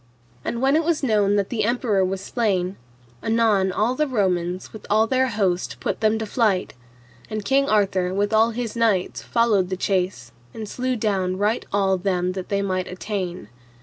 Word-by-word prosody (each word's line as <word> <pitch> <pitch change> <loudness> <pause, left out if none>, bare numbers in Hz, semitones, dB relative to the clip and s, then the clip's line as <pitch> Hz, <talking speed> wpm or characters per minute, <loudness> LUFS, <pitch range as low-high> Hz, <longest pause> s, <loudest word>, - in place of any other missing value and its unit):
And 235 +2 -3
when 270 +2 +4
it 320 - +3
was 320 -2 0
known 205 -5 +3
that 200 -1 0
the 220 -3 -1
emperor 225 -4 +1
was 190 +1 -2
slain, 195 -4 -1 0.5
anon 220 -4 +2
all 215 +6 +1
the 305 +3 0
Romans 185 -6 -1
with 220 - -10
all 215 +2 +4
their 260 +2 +2
host 195 -6 -1
put - - -2
them 220 0 +2
to 220 - -3
flight, 210 -4 0 0.6
and 215 -2 -4
King 275 +1 +2
Arthur 190 -4 +2
with 205 +3 0
all 220 +1 +5
his 235 -1 -4
knights 220 -6 +1
followed 215 -6 +2
the 185 - -2
chase, 180 - -1 0.2
and 220 -1 -6
slew 255 +4 -2
down 195 -4 0
right 210 +4 0
all 195 -2 +2
them 180 -1 0
that 185 -1 -6
they 200 0 0
might 185 -2 -1
attain. 185 - -4
205 Hz, 180 wpm, -23 LUFS, 185-230 Hz, 0.6 s, all